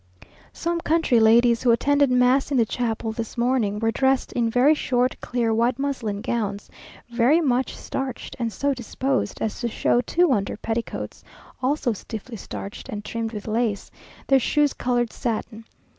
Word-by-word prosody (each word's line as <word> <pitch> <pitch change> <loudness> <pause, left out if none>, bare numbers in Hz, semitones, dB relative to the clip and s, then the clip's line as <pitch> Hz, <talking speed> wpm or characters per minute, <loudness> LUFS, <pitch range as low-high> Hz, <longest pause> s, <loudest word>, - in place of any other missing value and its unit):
Some 340 0 -2
country 320 -8 +2
ladies, 235 +1 +5
who 250 - +2
attended 285 +4 +3
mass 250 +2 +3
in 280 - +1
the 230 - +4
chapel 225 -1 -2
this 225 +2 -6
morning, 235 -4 +1
were 225 +1 +1
dressed 265 +2 +1
in 235 -2 +1
very 250 +6 +4
short 255 -4 0
clear 235 -2 0
white 235 +2 +1
muslin 250 -8 -2
gowns, 205 -4 -3 0.4
very 245 +7 +4
much 260 -5 0
starched, 270 -1 -5
and 230 -2 -1
so 280 +8 0
disposed 260 +2 -2
as 220 - -3
to 240 - -1
show 240 +1 +1
two 345 +6 +2
under 200 -5 0
petticoats, 225 +2 -4 0.4
also 260 -2 +1
stiffly 220 +3 -8
starched, 200 +1 -8
and 205 0 -6
trimmed 230 -1 -3
with 210 -2 -7
lace, 220 -2 -1 0.3
their 270 -1 +4
shoes 295 +3 +2
coloured 240 -2 -1
satin. 225 -1 -4
240 Hz, 160 wpm, -24 LUFS, 225-265 Hz, 0.4 s, ladies